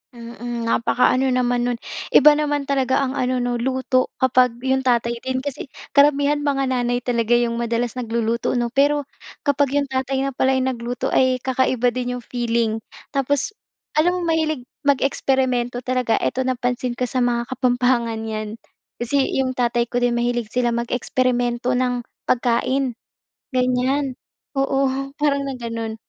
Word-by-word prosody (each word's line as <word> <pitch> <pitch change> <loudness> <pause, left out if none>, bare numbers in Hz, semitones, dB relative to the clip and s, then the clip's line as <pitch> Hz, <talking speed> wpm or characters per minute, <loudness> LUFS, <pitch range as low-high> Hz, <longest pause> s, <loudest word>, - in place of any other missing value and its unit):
Mm, 235 0 -6
napakaano 250 +3 +2
naman 245 -1 +1
no'n. 245 - 0 0.4
Iba 300 - +9
naman 295 -1 0
talaga 270 -2 +1
ang 260 - -1
ano 255 -1 0
'no, 245 -1 -1
luto, 255 +1 +1 0.2
kapag 255 -2 +4
'yong 265 0 +2
tatay 235 -2 +1
din, 260 +1 -3
kasi 285 -1 -5 0.2
karamihan 285 0 +4
mga 285 -2 0
nanay 245 -1 0
talaga 240 -1 +2
'yong 235 -1 +1
madalas 235 0 -1
nagluluto 230 0 -1
'no? 240 -1 0
Pero 285 +3 +3 0.4
kapag 285 -1 +1
'yong 280 -2 0
tatay 265 +1 -1
na 275 - -1
pala 265 0 +1
yung 260 0 +1
nagluto 240 0 -3
ay 255 -1 +2
kakaiba 255 -1 +1
din 250 0 -3
'yong 245 - -7
feeling. 230 -2 -1 0.3
Tapos 275 +4 0 0.5
alam 355 +3 +3
mo, 360 - -2
mahilig 310 -4 0 0.2
mag-eksperimento 260 -3 +1
talaga, 250 -2 +1
eto - - -1
napansin 250 -1 -1
ko 250 - -3
sa 255 +1 -1
mga 240 -1 +1
kapampangan 245 -3 +1
'yan. 215 -1 -4 0.4
Kasi 245 +4 0 0.2
'yong 265 -1 +1
tatay 240 -1 +1
ko 245 - +1
din 245 -1 +1
mahilig 240 -1 0
sila 240 +2 0
mag-eksperimento 245 +1 0
ng 250 -1 0 0.2
pagkain, 250 +1 +1 0.6
ganyan. 255 +2 +1 0.4
Oo, 270 0 +2 0.2
parang 280 -2 0
na 275 - -3
gano'n. 230 -2 -4
250 Hz, 150 wpm, -21 LUFS, 240-265 Hz, 0.6 s, Iba